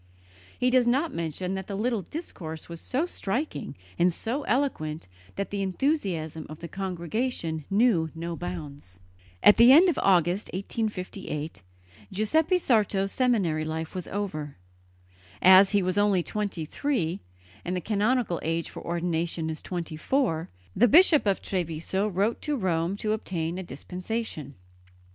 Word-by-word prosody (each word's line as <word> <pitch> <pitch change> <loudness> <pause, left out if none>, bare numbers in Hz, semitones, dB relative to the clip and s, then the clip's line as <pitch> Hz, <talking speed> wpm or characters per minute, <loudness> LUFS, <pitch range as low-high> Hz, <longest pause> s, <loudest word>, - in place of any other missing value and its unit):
He 250 0 +2
does 250 -1 +4
not 275 +7 +1
mention 170 +3 -3
that 190 -1 -4
the 200 - -4
little 230 0 0
discourse 170 - -7
was 170 -1 -8
so 270 +6 -1
striking 280 - -3 0.2
and 180 +1 +4
so 235 - -3
eloquent 170 - -1 0.3
that 200 - -3
the 200 -1 -2
enthusiasm 185 - -1
of 155 - -8
the 170 - -6
congregation 180 - -3
knew 195 -6 +3
no 170 +1 -4
bounds. 145 - -7 0.4
At 210 - +8
the 235 +2 +8
end 340 +7 +8
of 335 - 0
August, 180 +1 +3
1858, 185 - -4 0.5
Giuseppe 310 - +2
Sarto's 205 - +1
seminary 200 - +1
life 160 +1 -4
was 185 -2 -5
over. 155 - -4 0.8
As 190 +1 +8
he 205 -2 +2
was 185 +2 +1
only 200 -4 +3
twenty 200 -6 -3
three, 190 - -1 0.4
and 180 - -2
the - - 0
canonical 210 +1 0
age 165 +1 -2
for - - -9
ordination 170 -1 -2
is 155 - -6
twenty 170 -3 -5
four, 165 - 0 0.3
the 245 - +5
Bishop 310 - +6
of 195 - +1
Treviso 180 +2 -1
wrote 205 +3 0
to 300 -2 -1
Rome 180 -2 0
to 215 +1 -1
obtain 180 -5 -2
a - - -4
dispensation. 180 - -5
190 Hz, 145 wpm, -27 LUFS, 165-225 Hz, 0.8 s, At